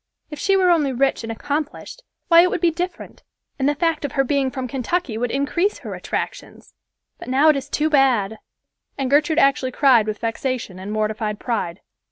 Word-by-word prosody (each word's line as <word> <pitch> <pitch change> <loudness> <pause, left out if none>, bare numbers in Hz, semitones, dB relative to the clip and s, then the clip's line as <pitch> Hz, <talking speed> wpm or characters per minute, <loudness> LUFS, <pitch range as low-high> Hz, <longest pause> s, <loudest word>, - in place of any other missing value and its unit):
If 300 - -7
she 390 +4 +2
were 365 -2 +4
only 300 -5 +2
rich 270 +2 +1
and 225 -1 -5
accomplished, 290 - -4 0.3
why, 335 -1 +7
it 360 - +3
would - - -2
be 335 0 +3
different, 350 +2 -6 0.4
and 270 +1 +2
the 295 - 0
fact 325 0 0
of 285 - -3
her 270 - +2
being 275 0 0
from 260 -1 -5
Kentucky 270 +1 -2
would 240 +2 -2
increase 295 - 0
her - - -8
attractions. - - -6 0.5
But - - -10
now 275 +5 +4
it 305 - +5
is 275 0 -5
too 300 +2 0
bad!" 250 -8 +2 0.6
And 270 -1 -2
Gertrude 300 +2 +3
actually 275 -4 +3
cried 250 -5 +4
with 215 0 -2
vexation 230 -4 -3
and 195 +2 -6
mortified 215 0 -2
pride. 205 -7 -3
275 Hz, 195 wpm, -21 LUFS, 230-310 Hz, 0.6 s, why